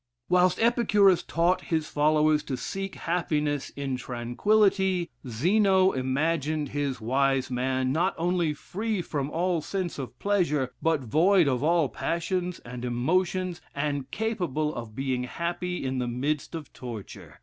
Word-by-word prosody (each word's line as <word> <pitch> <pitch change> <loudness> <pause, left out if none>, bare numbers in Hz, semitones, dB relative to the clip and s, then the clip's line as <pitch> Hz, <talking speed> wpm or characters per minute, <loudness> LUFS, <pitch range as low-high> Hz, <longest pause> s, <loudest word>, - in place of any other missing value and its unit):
Whilst 180 0 +3
Epicurus 210 -5 +4
taught 170 +2 +1
his 160 -2 -1
followers 150 0 +3
to 135 -3 -3
seek 195 +9 -4
happiness 150 -4 -1
in 135 -2 -3
tranquillity, 185 - +1 0.2
Zeno 190 - +3
imagined 150 +3 0
his 140 -2 -2
wise 130 +3 +1
man, 130 +1 0
not 175 +6 +1
only 175 -1 +1
free 210 +4 -3
from 145 -3 -3
all 175 +1 0
sense 180 -2 -3
of 125 -2 -6
pleasure, 160 -10 +1
but 160 -3 +2
void 165 - +4
of 130 -2 +1
all 165 -1 +3
passions 175 +4 -2
and 120 +1 -8
emotions, 175 +9 0
and 140 -2 -2
capable 175 - -1
of 115 -3 -7
being 130 -2 -1
happy 175 +3 -3
in 130 0 -1
the 125 - -1
midst 140 +7 -2
of 155 -4 -8
torture. 115 -5 -9
155 Hz, 140 wpm, -27 LUFS, 130-180 Hz, 0.2 s, Epicurus